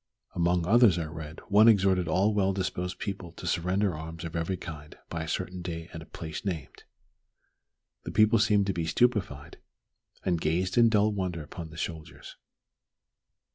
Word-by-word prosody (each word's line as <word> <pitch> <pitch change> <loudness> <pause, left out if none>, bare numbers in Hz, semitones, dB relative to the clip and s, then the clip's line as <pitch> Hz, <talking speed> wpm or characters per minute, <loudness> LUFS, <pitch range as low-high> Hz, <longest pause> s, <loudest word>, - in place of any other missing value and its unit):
Among 85 0 +1
others 110 -2 +5
I 85 - -2
read 80 0 -8
one 105 +2 +6
exhorting 95 -5 +4
all 95 +6 +2
well 95 -2 +2
disposed 90 -1 -3
people 95 -4 -5
to - - -10
surrender 95 +3 0
arms 80 +2 -7
of 85 -1 -6
every 85 +3 -1
kind 75 -3 -9
by 85 - -3
a 80 - -5
certain 90 +2 -3
day 85 -1 -6
at 80 - -7
a 80 - -12
place 80 -2 -7
named. 85 -8 -5 1.2
The - - -4
people 110 +2 +4
seemed 105 -2 +3
to 95 - 0
be 85 -2 -2
stupefied, 95 - 0 0.7
and 85 -3 0
gazed 90 +4 0
in 115 -1 +6
dull 105 -1 +3
wonder 90 -5 -3
upon 80 +2 -8
the 80 - -12
soldiers. 80 -2 -7
90 Hz, 170 wpm, -28 LUFS, 80-100 Hz, 1.2 s, one